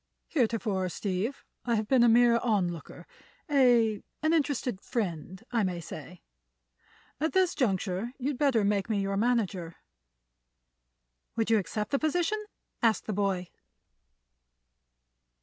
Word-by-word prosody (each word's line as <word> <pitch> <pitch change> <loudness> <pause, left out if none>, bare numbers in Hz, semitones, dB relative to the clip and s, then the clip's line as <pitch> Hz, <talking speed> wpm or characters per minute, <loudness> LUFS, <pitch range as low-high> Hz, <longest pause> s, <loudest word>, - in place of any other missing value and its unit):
Heretofore, 220 - 0
Steve, 200 +8 -3 0.2
I 235 -1 +1
have 215 -1 -1
been 260 0 +4
a 240 - +6
mere 235 0 +5
onlooker, 185 -9 -2 0.5
a—an 245 +3 +2
interested 270 - 0
friend, 185 - -4
I 235 -2 +2
may 180 -3 -1
say. 165 +1 -9 1.0
At 315 +2 0
this 375 -2 +3
juncture 200 - -1
you'd 270 0 -3
better 265 -7 +3
make 200 0 0
me 210 -2 +1
your 195 0 -1
manager." 200 -7 0 1.6
"Would 225 0 0
you 220 - +5
accept 210 +2 -4
the 275 - +2
position?" 355 +7 0 0.4
asked 225 -2 +2
the 215 - -2
boy. 190 -3 -1
220 Hz, 120 wpm, -29 LUFS, 190-250 Hz, 1.6 s, a